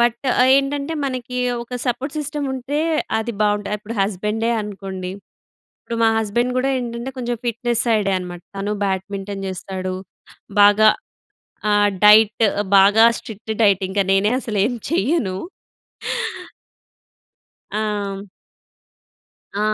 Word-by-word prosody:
But, 235 0 +2 0.4
ఏంటంటే, 280 +2 0
మనకి 255 -1 -4 0.3
ఒక 250 +1 -8
సపోర్ట్ 265 +5 -2
సిస్టమ్ 295 -1 -3
ఉంటే, 265 +3 -3 0.4
అది 230 +1 -3
బావుంట 205 -1 +1
ఇప్పుడు 220 +3 -7
హస్బెండే 210 +4 -1
అనుకోండి. 190 -3 -6 0.7
ఇప్పుడు 230 - -5
మా 225 - +6
హస్బెండ్ 235 +3 0
కూడా 270 +1 +1
ఏంటంటే, 240 +1 -4
కొంచెం 240 -1 -2
ఫిట్‍నెస్ 235 0 +1
సైడే 210 -4 +2
అనమాట. 175 -1 -7 0.2
తను 205 +2 -2
బ్యాడ్మింటన్ 195 +1 -3
చేస్తాడు. 185 0 -4 0.7
బాగా 205 +1 +6 0.8
ఆహ్, 205 0 +4 0.2
డైట్ 215 +1 +6 0.4
బాగా 205 +4 +6
స్ట్రిక్ట్ 220 0 -7
డైట్ 200 -2 +4
ఇంకా 200 +1 +1
నేనే 200 +3 +3
అసలు 215 -5 -3
ఏమి 245 +2 -1
చేయను. 235 - 0 2.4
ఆ! 205 -2 -3 1.3
ఆ! - - 0
215 Hz, 110 wpm, -20 LUFS, 200-240 Hz, 2.4 s, మా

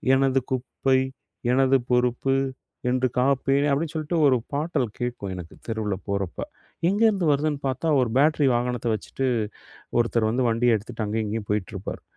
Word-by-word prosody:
"எனது 135 0 +3
குப்பை, 130 +1 +1 0.6
எனது 135 +1 +4
பொறுப்பு 125 +2 +2 0.6
என்று 130 0 +2
காப்பேன்" 135 +2 +2
அப்டின்னு 150 +3 0
சொல்ட்டு 160 +2 -1
ஒரு 130 -2 +4 0.2
பாட்டல் 145 -3 0
கேட்கும் 120 -6 -3
எனக்கு, 90 -2 -9
தெருவுல 105 -3 -1
போறப்ப. 100 -3 -2 0.5
எங்கேருந்து 205 -2 +3
வருதுன்னு 145 0 0
பார்த்தா, 135 +5 -2
ஒரு 125 - +1
பேட்ரி 150 0 +4
வாகனத்த 120 -1 -1
வச்சுட்டு 130 +5 -4 0.7
ஒருத்தரு 115 -1 +2
வந்து 125 +2 +1
வண்டியை 115 +1 +3
எடுத்துட்டு, 110 +2 -6
அங்கேயும், 110 +1 -1
இங்கேயும் 105 0 -4
போயிட்டுருப்பார். 105 -1 -3
125 Hz, 140 wpm, -25 LUFS, 115-140 Hz, 0.7 s, எனது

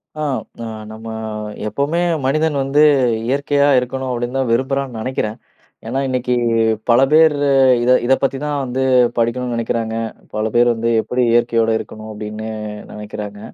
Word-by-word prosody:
அ 155 - -5 0.4
அ - - -5 0.2
நம்ம 110 +1 -9 0.6
எப்போவுமே 140 +10 -1 0.2
மனிதன் 155 +2 +1
வந்து 140 +3 +3 0.4
இயற்கையா 140 +1 +2
இருக்கணும் 130 +1 -4
அப்படின்னு 120 +2 -3
தான் 130 -3 0
விரும்புறான்னு 130 0 -1
நினைக்கிறேன். 110 -2 -3 0.5
ஏன்னா, 130 +4 -1
இன்னைக்கு 125 -1 -1 0.6
பல 120 +2 +5
பேர் 160 -1 +6 0.5
இதை 125 +1 +4
இதை 135 +2 +4
பத்தி 135 0 +1
தான் 145 -1 -1
வந்து 130 +1 -2 0.3
படிக்கணும்னு 120 +1 0
நினைக்கிறாங்க. 115 -1 -2 0.4
பல 110 +1 0
பேர் 120 0 +5
வந்து 115 +1 -1
எப்படி 125 +3 -2
இயற்கையோடு 115 -1 +2
இருக்கணும் 110 0 -9
அப்படின்னு 105 +1 -6 0.4
நினைக்கிறாங்க. 105 -1 -7
125 Hz, 135 wpm, -18 LUFS, 115-135 Hz, 0.6 s, பேர்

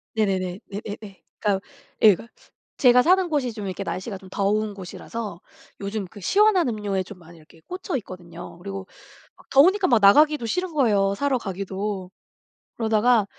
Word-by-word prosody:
네네네 190 -4 0
예예예. 205 -1 -7 0.2
그러니까 200 -2 0 0.4
예 210 -3 +8 0.6
제가 250 -1 +6
사는 370 +5 +4
곳이 280 -6 0
좀 210 -2 -6
이렇게 195 +1 -4
날씨가 195 +2 -4
좀 190 -1 -14
더운 205 +2 0
곳이라서 200 0 -7 0.4
요즘 200 0 -3
그 205 +3 -13
시원한 400 - +4
음료에 205 -4 -2
좀 185 0 -12
많이 170 0 -15
이렇게 160 +1 -19
꽂혀 365 -2 -4
있거든요. 175 -6 -10
그리고 195 +1 -7 0.5
막 - - -22
더우니까 365 +8 +5
막 240 -3 +4
나가기도 295 +7 +5
싫은 360 +9 -2
거예요 205 -9 +2
사러 280 +2 +1
가기도. 195 -2 -4 0.7
그러다가 225 0 +3
210 Hz, 355 characters per minute, -24 LUFS, 190-250 Hz, 0.7 s, 예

